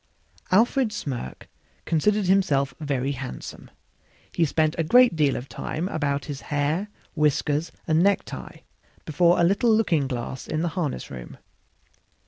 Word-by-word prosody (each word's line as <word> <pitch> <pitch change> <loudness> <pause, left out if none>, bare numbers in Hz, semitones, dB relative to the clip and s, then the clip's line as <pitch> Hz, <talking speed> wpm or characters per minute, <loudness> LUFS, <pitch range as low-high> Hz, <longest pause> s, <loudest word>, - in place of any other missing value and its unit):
Alfred 230 +4 +3
Smirk 135 - -6 0.4
considered 205 +5 +1
himself 175 -8 +2
very 140 -3 -1
handsome; 135 -2 -7 0.6
he 170 - +1
spent 155 +1 +1
a - - +3
great 245 +5 +5
deal 145 -4 +2
of 125 - -5
time 165 +5 -4
about 145 -4 -1
his 145 -3 -6
hair, 150 +7 -1 0.3
whiskers 150 +1 +1
and 160 +1 +2
necktie, 200 +2 -1 0.4
before 170 +3 +3
a - - +4
little 200 +7 +3
looking 180 -11 +2
glass 125 0 -5
in 155 +1 -2
the 175 - 0
harness 160 -3 -3
room. 60 -2 -9
155 Hz, 135 wpm, -25 LUFS, 140-185 Hz, 0.6 s, great